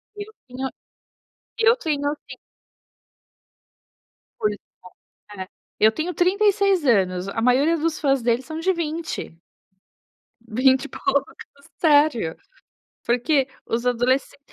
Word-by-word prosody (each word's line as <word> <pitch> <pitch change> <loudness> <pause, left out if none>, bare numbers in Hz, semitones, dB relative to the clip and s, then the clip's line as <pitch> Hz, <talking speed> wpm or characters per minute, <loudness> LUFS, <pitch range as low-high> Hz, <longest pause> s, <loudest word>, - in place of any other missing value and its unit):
Eu 415 +1 -8 0.2
tenho, 260 +1 -4 0.9
eu 460 +1 +5
tenho 300 -10 -2
assim 295 0 -9 2.0
Pois 210 -1 0 0.8
é, 190 - -5
é, 185 - -9 0.3
eu 220 +1 +6
tenho 320 +9 -3
36 395 -1 +2
anos, 190 -6 +2
a 210 - -3
maioria 265 +8 +3
dos 325 0 -1
fãs 275 -3 +2
dele 235 +1 +1
são 315 +4 -7
de 370 +4 +1
20. 325 - -4 1.1
20 260 +4 +3
e - - -7
poucos, 275 0 -1 0.5
sério, 290 - +3 0.7
porquê 260 +3 +1 0.2
os 235 +2 -2
adolescen 250 +3 +1
275 Hz, 110 wpm, -23 LUFS, 240-330 Hz, 2.0 s, eu